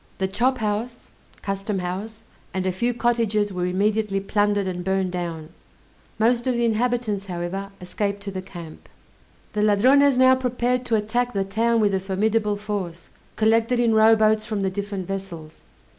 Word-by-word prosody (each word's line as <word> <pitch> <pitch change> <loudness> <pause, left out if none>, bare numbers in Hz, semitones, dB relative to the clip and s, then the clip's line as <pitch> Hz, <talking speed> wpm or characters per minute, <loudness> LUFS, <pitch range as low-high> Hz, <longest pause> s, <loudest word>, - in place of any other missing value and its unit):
The 190 - 0
chop 250 +7 +1
house 220 +2 -3 0.3
(custom 195 0 -2
house) 195 +5 -5 0.3
and 190 0 -1
a 185 - +1
few 235 +7 0
cottages 230 -4 0
were 180 0 -1
immediately 205 +2 0
plundered, 205 0 +1
and 180 -1 -4
burned 190 0 0
down; 170 -3 -5 0.7
most 235 +2 +2
of 255 - +1
the 235 0 +1
inhabitants, 225 -3 0
however, 180 +2 -4
escaped 200 +2 -3
to 200 - -5
the 190 -1 -4
camp. 175 -4 -11 0.6
The 210 - 0
Ladrones 255 +7 +4
now 260 0 +6
prepared 250 -1 -1
to 230 - +2
attack 240 +4 0
the 195 -1 0
town 225 +4 +1
with 205 -2 +2
a 190 - +1
formidable 210 +3 0
force, 205 -5 -5 0.3
collected 225 +2 +2
in 235 -2 +3
rowboats 220 0 +4
from 210 -3 -3
the 190 - 0
different 200 -1 -4
vessels. 180 -5 -7
210 Hz, 160 wpm, -23 LUFS, 190-230 Hz, 0.7 s, now